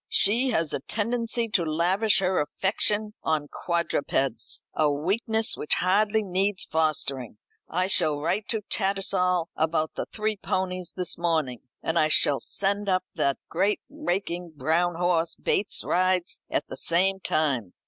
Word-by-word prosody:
"She 235 +6 +3
has 165 - 0
a - - -1
tendency 230 - -1
to 200 -5 +2
lavish 180 +7 +2
her 185 0 +1
affection 210 +6 0
on 155 -2 0
quadrupeds 140 -8 -1
a 150 -2 +2
weakness 220 - 0
which 150 - 0
hardly 210 +4 +2
needs 190 +1 +1
fostering. 140 -7 -1 0.3
I 180 +3 +1
shall 160 -6 +2
write 195 +8 -1
to 220 -2 -1
Tattersall 190 -3 0
about 160 0 0
the - - -4
three 215 -1 -1
ponies 185 -2 -2
this 180 -2 -1
morning; 160 -8 0 0.2
and 165 +1 +1
I 155 - +4
shall 145 -2 +3
send 200 +1 -1
up 185 -1 +2
that 140 -1 0
great 195 +5 +1
raking 180 - -3
brown 165 +5 +1
horse 170 -1 +1
Bates 205 - 0
rides 185 0 +1
at - - -1
the - - -8
same 190 +3 +2
time. 135 - -1
180 Hz, 145 wpm, -26 LUFS, 160-200 Hz, 0.3 s, I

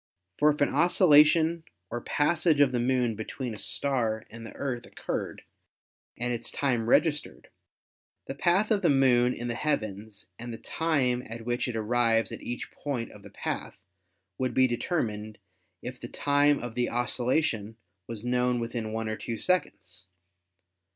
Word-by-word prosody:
For 150 - +5
if 150 -1 -1
an 145 - +4
occultation 165 -1 +5 0.3
or 120 +1 -3
passage 155 +2 +2
of 140 -3 +5
the 125 - 0
Moon 125 -1 +1
between 110 +3 -5
a 105 - -7
star 115 -6 0
and 115 0 -9
the 115 - -10
Earth 125 -4 -4
occurred - - -5 0.7
and 120 +1 -1
its 120 0 -4
time 125 -5 0
registered, 150 - +1 0.8
the - - -5
path 180 +9 +2
of 205 -2 +3
the 175 - +3
Moon 125 -3 +4
in 120 -1 -5
the 120 - -1
heavens 110 -6 -3
and 120 +1 -6
the 115 - -6
time 135 -7 0
at 115 0 -8
which 120 +1 -1
it 125 - -4
arrives 115 0 +2
at - - -7
each 120 - -5
point 130 -5 -4
of 105 - -14
the 100 - -12
path - - -5 0.6
would 130 -1 -1
be 130 - +5
determined 110 -5 -2 0.5
if - - -6
the - - -7
time 145 0 +2
of 120 -2 -6
the 120 +1 0
occultation 120 -2 0 0.3
was 115 0 -6
known 125 0 +1
within 115 -2 -4
one 110 0 -2
or 110 0 -3
two 115 - -4
seconds. 95 - -2
120 Hz, 165 wpm, -28 LUFS, 115-145 Hz, 0.8 s, For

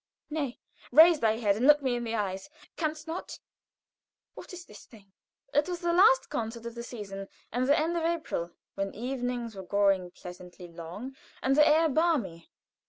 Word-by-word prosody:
Nay, 285 -5 -3 0.3
raise 325 0 +8
thy 220 -1 +2
head 205 -4 +2
and 240 +6 +1
look 295 -1 +6
me 255 -2 +1
in 240 - -3
the 230 -1 -3
eyes! 195 +1 -3 0.3
Canst 310 -1 -3
not? 330 +2 -6 1.0
What - - -11
is 360 -1 -9
this 210 - -14
thing?" 200 -4 -18 0.4
It 295 +4 +2
was 355 -1 -4
the 345 -1 +1
last 435 +8 +5
concert 230 +1 -4
of 235 - -5
the 235 - -7
season, 195 -5 -7 0.2
and 250 +4 0
the 290 - +5
end 330 +3 0
of 340 - 0
April, 325 - -2 0.2
when 195 0 -4
evenings 245 -1 -3
were 190 - -6
growing 195 -1 +1
pleasantly 180 0 -11
long 175 +10 -8 0.3
and 265 +1 +3
the 300 +1 +6
air 320 +2 +5
balmy. 275 - 0
240 Hz, 180 wpm, -29 LUFS, 200-310 Hz, 1.0 s, raise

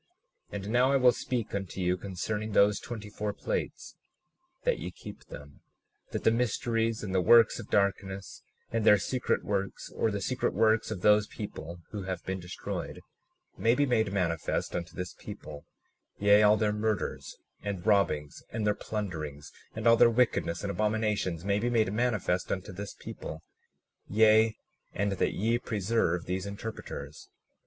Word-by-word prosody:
37:21 - - -6
And 100 - -6
now, 125 +3 +4
I - - +3
will 125 -2 +6
speak 120 -2 -3
unto 95 -1 -4
you 90 0 +2
concerning 105 +3 -4
those 100 +1 +4
twenty 110 -3 -7
four 105 0 -3
plates, - - -4 0.7
that - - +1
ye - - -4
keep - - -11
them, - - -11 0.5
that - - -4
the - - +5
mysteries 115 -1 0
and 95 -3 -4
the 95 - +3
works 115 +5 +6
of - - -9
darkness, 100 -1 -1 0.3
and 115 -1 0
their 105 -1 +7
secret 125 +6 -1
works, 100 -1 -3
or 115 - 0
the 100 -1 -2
secret 130 +6 -1
works 110 0 +3
of 105 -5 -4
those 105 +1 +5
people 85 -5 -7
who 105 - -4
have 95 -2 -5
been 95 0 -3
destroyed, 90 0 -6 0.6
may 115 +2 +4
be 145 - +3
made 110 -6 +1
manifest 85 -5 -1
unto 85 0 -4
this 90 -1 -5
people; 75 -1 -10 0.5
yea, 100 +1 +6
all 105 0 +6
their 105 -1 +1
murders, 105 0 -2 0.2
and 100 -3 -4
robbings, 100 -9 +1
and 110 -1 -2
their 105 - +3
plunderings, 80 -10 -5 0.2
and 110 0 -5
all 115 0 +7
their 120 0 +7
wickedness 115 -8 +1
and 100 - -1
abominations, 105 -5 0
may 100 0 +2
be 120 +3 0
made 110 -4 +2
manifest 105 -6 0
unto 95 -1 -3
this 100 +2 -7
people; 80 +1 -8 0.6
yea, 110 +1 +5 0.4
and 100 0 0
that 95 - 0
ye 115 +4 +1
preserve 100 -6 0
these 95 +2 -2
interpreters. 100 -8 -7
105 Hz, 165 wpm, -29 LUFS, 95-110 Hz, 0.7 s, their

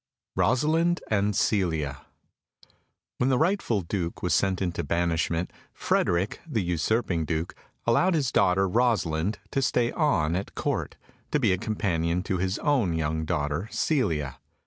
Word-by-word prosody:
Rosalind 160 +7 +2
and 105 -1 +2
Celia 80 -9 0 1.1
When 125 - +2
the 130 - +3
rightful 160 - +1
Duke 85 -1 -4
was 90 -4 +1
sent 95 +3 +2
into 85 -2 -2
banishment, 85 +2 0 0.2
Frederick, 90 +4 0
the 115 -10 -1
usurping 85 +1 0
Duke, 80 +1 -2 0.3
allowed 170 +10 +3
his 140 -6 0
daughter 95 -1 +3
Rosalind 95 -4 +1
to 135 - 0
stay 120 -2 +1
on 85 - +1
at 95 +2 -4
Court, - - -2 0.3
to 150 - +1
be 110 -8 +3
a 90 - -1
companion 90 -5 -1
to 95 -2 -2
his 95 +2 0
own 125 - +1
young 80 0 -1
daughter 75 +2 -1
Celia. 80 - 0
95 Hz, 140 wpm, -26 LUFS, 85-120 Hz, 1.1 s, the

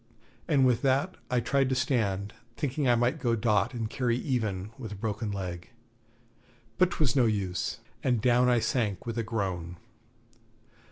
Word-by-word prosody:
And 140 -5 +4
with 125 -2 +3
that 140 +8 +1
I 125 - +2
tried 135 +2 +1
to 130 - +1
stand, 105 -7 0 0.2
thinking 140 -2 0
I 120 - +5
might 120 +6 +1
go 120 -4 +1
dot 110 +2 +1
and 115 -2 -2
carry 120 +1 0
even 110 -8 -2
with 110 -5 -6
a - - -5
broken 105 +1 -3
leg. 90 -4 -5 1.1
But 185 -1 +5
'twas 145 -9 0
no 125 -4 +4
use, 95 -5 -2 0.2
and 125 -3 +2
down 125 +2 +4
I 120 -2 +3
sank 110 -3 -1
with 115 0 -3
a - - 0
groan. 95 -6 -3
115 Hz, 165 wpm, -29 LUFS, 105-130 Hz, 1.1 s, I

